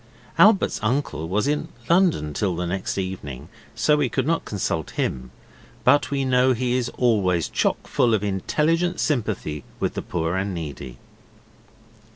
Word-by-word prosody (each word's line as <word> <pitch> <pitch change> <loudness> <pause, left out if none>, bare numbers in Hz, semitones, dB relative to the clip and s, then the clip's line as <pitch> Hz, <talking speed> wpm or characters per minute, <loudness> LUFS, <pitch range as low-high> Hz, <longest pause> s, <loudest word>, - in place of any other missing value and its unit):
Albert's 215 -2 +5
uncle 110 - -1
was 105 +7 +1
in 150 +1 0 0.2
London 170 - +2
till 95 -1 -1
the 90 +1 -2
next 95 +3 -3
evening, 80 -7 -5 0.3
so 150 -1 +3
we 145 -4 +1
could 130 +1 -1
not 165 +2 0
consult 85 -6 -2
him, 65 0 -2 0.5
but 145 +3 +4
we 140 -1 -1
know 130 0 +4
he 125 0 -1
is 125 -2 0
always 95 -9 +2
chock - - 0
full 115 -2 +2
of 105 - -2
intelligent 155 - 0
sympathy 105 - -1 0.2
with - - -1
the - - -3
poor 85 0 -2
and 95 0 -2
needy. 70 -6 -7
105 Hz, 155 wpm, -23 LUFS, 85-135 Hz, 0.5 s, Albert's